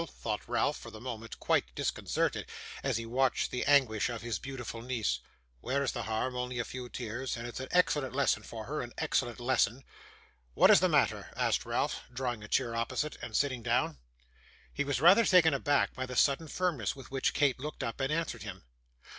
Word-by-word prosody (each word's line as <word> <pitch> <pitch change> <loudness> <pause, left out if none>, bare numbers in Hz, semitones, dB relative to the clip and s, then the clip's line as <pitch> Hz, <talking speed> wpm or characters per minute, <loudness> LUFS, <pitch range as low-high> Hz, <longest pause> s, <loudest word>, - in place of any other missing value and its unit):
thought 105 -2 -2
Ralph - - +1
for - - -9
the 110 - -10
moment 115 -2 -7
quite - - +1
disconcerted, - - -1 0.3
as 135 -4 0
he 115 - -4
watched 130 +3 +1
the 125 - -1
anguish 130 -7 +4
of 115 -2 -5
his 115 -6 -2
beautiful 120 -4 -6
niece. 120 -3 -1 0.4
'Where 135 - 0
is 130 - 0
the - - -4
harm? 110 +3 -2
only 125 0 -3
a 120 - -1
few 125 +1 -7
tears; 120 +2 -4
and 115 - -6
it's 120 - -6
an 130 - -5
excellent 145 -7 +2
lesson 140 0 +2
for 110 -2 -8
her, 150 +5 -3
an 120 0 -7
excellent 120 0 0
lesson.' 125 +1 +1 0.7
'What - - +7
is - - +8
the - - +3
matter?' - - +2
asked - - +1
Ralph, - - 0
drawing 125 -3 -3
a - - -8
chair 120 0 0
opposite, 130 +6 -1
and 110 - -6
sitting 130 -2 +1
down. 115 - 0 0.7
He 145 - 0
was 145 -2 -1
rather 180 - +7
taken 180 -7 +5
aback 140 +1 +2
by 130 0 -4
the 125 - -6
sudden 140 +5 +3
firmness 155 - -1
with 135 -2 -12
which 135 -1 0
Kate 140 -3 +2
looked 150 +3 -5
up 115 - -4
and 135 +1 0
answered 165 +1 -1
him. 95 -4 -7
125 Hz, 200 wpm, -31 LUFS, 115-140 Hz, 0.7 s, is